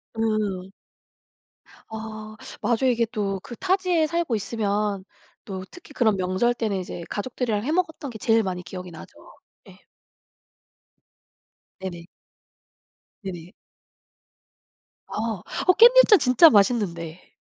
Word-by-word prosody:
음. 210 -4 -1 1.2
아. 215 -1 -8 0.3
맞아요 240 +4 +2
이게 235 -1 +1
또 200 -4 -2
그 240 - -9
타지에 365 - +1
살고 335 -7 -1
있으면 205 -2 -2 0.4
또 190 -2 -6
특히 355 -5 -14
그런 220 -7 +2
명절 185 +6 +1
때는 220 -4 -2
이제 175 -1 -7
가족들이랑 220 -1 -2
해 295 - -2
먹었던 320 -4 -1
게 225 - -8
제일 225 +1 +2
많이 185 -2 -3
기억이 180 0 -8
나죠. 160 - -12 0.5
예. - - -17 2.0
네네. 175 -3 -7 1.2
네네. 180 -1 -8 1.5
아. 220 -4 -3 0.2
어 365 - +6
깻잎전 475 -1 +7
진짜 255 +6 +7
맛있는데. 195 - 0
215 Hz, 215 characters per minute, -24 LUFS, 190-250 Hz, 2.0 s, 깻잎전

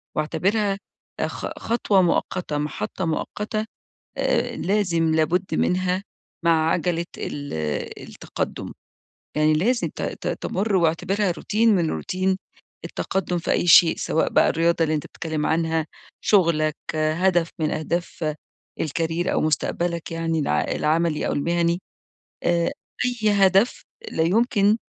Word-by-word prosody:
واعتبرها 195 +6 0 0.4
أ - - +1
خ - - -5
خطوة 215 -4 +2
مؤقتة 175 -2 0
محطة 150 +5 -3
مؤقتة 210 +6 -2 0.5
آآ - - 0
لازم 170 -5 +1
لابد 170 +4 +1
منها 185 +1 +1 0.4
مع 160 -1 +4
عجَلة 170 0 0
ال 145 -1 -5 0.6
التقدم. - - -5 0.6
يعني 155 +1 +4
لازم 235 +11 +1
ت - - -5
ت - - -4
تمُر 200 +2 -1
واعتبرها 185 +3 +1
روتين 215 +5 +2
من 170 -4 +1
روتين 185 0 -1 0.5
التقدم 190 -2 -2
في 170 - -2
أي - - +1
شيء 170 -1 +8
سواء 160 - 0
بقى - - +4
الرياضة 170 0 +2
اللي 155 -1 +1
أنت 150 - -3
بتتكلم 155 -2 -3
عنها 160 -1 +1 0.3
شُغلك 165 -6 +3 0.2
هدف 165 +2 +2
من 155 -1 0
أهداف 160 0 -2 0.5
الcareer 165 +3 -1
أو - - +1
مُستقبلك 170 +2 -1
يعني 165 -1 -1
الع 145 - +1
العملي 160 0 0
أو - - 0
المهني، 170 +3 +1 0.6
آآ 170 -1 +2 0.5
أي - - +6
هدف 195 +3 +3 0.3
لا 160 - +1
يمكن 210 +3 +3
170 Hz, 125 wpm, -23 LUFS, 160-190 Hz, 0.6 s, شيء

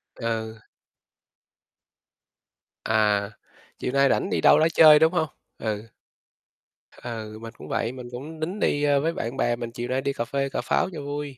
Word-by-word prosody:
Ừ. 110 -1 -4 2.3
À, 105 -2 +2 0.5
chiều 125 - -2
nay 140 0 +4
rảnh - - +1
đi - - 0
đâu - - +6
đó 160 - +4
chơi, 155 -2 +8
đúng 160 +2 +4
hông? 160 -3 +1 0.3
Ừ. 105 -2 -3 1.2
Ừ, 110 -2 -6
mình 115 0 -8
cũng - - -11
vậy, 115 - -1
mình 125 -1 -9
cũng 145 +6 -8
tính 175 +6 -3
đi, 145 -6 +1
ơ, 145 -1 +3
với 165 +3 0
bạn 120 -4 -4
bè 120 0 +1
mình 120 -1 -6
chiều 120 +1 -5
nay, 130 +1 -1
đi 140 +1 -1
cà 115 - -3
phê 135 +3 -2
cà - - -3
pháo - - 0
cho 155 - -6
vui. 145 -1 -5
130 Hz, 180 wpm, -25 LUFS, 115-145 Hz, 2.3 s, chơi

